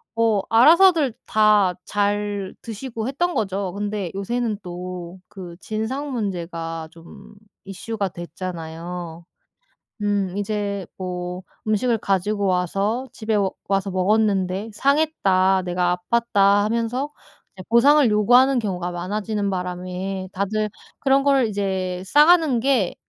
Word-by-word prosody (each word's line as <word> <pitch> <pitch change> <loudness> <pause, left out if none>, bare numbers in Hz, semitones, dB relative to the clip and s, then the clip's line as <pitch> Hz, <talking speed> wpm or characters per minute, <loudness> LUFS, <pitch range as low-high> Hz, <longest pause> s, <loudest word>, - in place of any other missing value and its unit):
어 225 -3 +2
알아서들 310 - +6
다 210 -4 +4
잘 205 -1 -1
드시고 230 +1 -5
했던 345 +6 -1
거죠. 195 -3 -2
근데 205 -3 -3
요새는 220 +2 -2
또 180 0 -7
그 180 -3 -9
진상 255 +7 -3
문제가 170 -7 -4
좀 165 +5 -15 0.3
이슈가 200 +1 -4
됐잖아요. 170 -1 -7 0.8
음. 200 -2 0
이제 205 -2 -2
뭐 180 0 -5 0.3
"음식을 225 +2 +1
가지고 200 +1 0
와서 195 +7 0
집에 220 -1 -2
오 195 -2 +1 0.2
와서 195 0 0
먹었는데 195 0 +1
상했다. 200 -10 +2
내가 180 0 0
아팠다." 205 -4 +3
하면서 235 +6 -1 0.4
이제 185 - -9
보상을 275 +4 +5
요구하는 245 +5 +4
경우가 180 -5 -3
많아지는 200 +3 -2
바람에 185 +1 -4
다들 210 +2 -1 0.3
그런 275 0 +3
걸 275 -4 +3
이제 190 -3 -2
싸 295 +10 +5
가는 320 -8 +4
게 245 -7 +1
200 Hz, 250 characters per minute, -22 LUFS, 185-230 Hz, 0.8 s, 알아서들